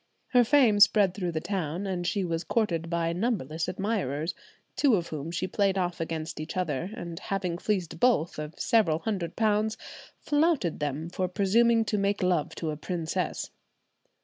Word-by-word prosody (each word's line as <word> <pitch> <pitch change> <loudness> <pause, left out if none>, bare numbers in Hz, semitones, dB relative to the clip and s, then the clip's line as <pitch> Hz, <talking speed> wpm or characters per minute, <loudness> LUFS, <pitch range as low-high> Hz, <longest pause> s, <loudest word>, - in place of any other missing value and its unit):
Her 245 -1 +5
fame 235 -5 +4
spread 200 -2 +6
through 180 -3 -2
the 160 - 0
town, 180 -1 -3
and 180 -2 -2
she 200 -3 0
was 165 -1 -2
courted 170 -8 0
by 170 -1 0
numberless 170 - -1
admirers, 185 - -2 0.4
two 275 -6 +4
of 170 -3 -2
whom 155 0 -5
she 175 +2 -2
played 195 0 +1
off 175 -2 -1
against 160 -1 -4
each 155 +4 -5
other; 170 -1 -1
and 170 -7 -6
having 180 -3 -3
fleeced 180 -6 -2
both 175 -11 +2
of 150 +1 -7
several 195 -9 +3
hundred 180 -3 -3
pounds, 215 0 +1 0.4
flouted 290 - +1
them 150 +2 -2
for 185 0 -1
presuming 225 +5 +3
to 210 -1 0
make 200 0 0
love 175 -5 +1
to 160 -2 -3
a 150 - -5
princess. 170 +2 -3
180 Hz, 170 wpm, -28 LUFS, 165-210 Hz, 0.4 s, spread